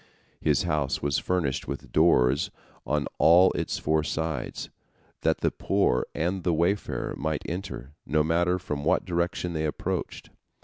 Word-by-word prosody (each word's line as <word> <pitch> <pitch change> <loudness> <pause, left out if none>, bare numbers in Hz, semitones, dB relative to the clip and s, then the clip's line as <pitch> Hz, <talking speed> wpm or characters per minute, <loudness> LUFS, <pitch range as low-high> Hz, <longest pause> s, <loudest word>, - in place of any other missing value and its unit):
His - - +2
house 75 -3 -1
was 70 -2 +1
furnished 85 -8 -1
with 70 +1 -6
doors 70 -5 +4 0.4
on 75 +2 0
all 90 +3 +7
its - - -2
four 80 0 +1
sides, 80 -3 -3 0.5
that - - +1
the - - +2
poor 60 - +1
and 90 +4 -1
the 85 -2 +1
wayfarer 90 +5 0
might 80 -1 -2
enter, 85 -7 -6
no 75 0 +1
matter 85 +3 +2
from 75 -5 -4
what - - +2
direction 90 0 -1
they 80 -1 -1
approached. 75 - -4
80 Hz, 145 wpm, -27 LUFS, 75-90 Hz, 0.5 s, all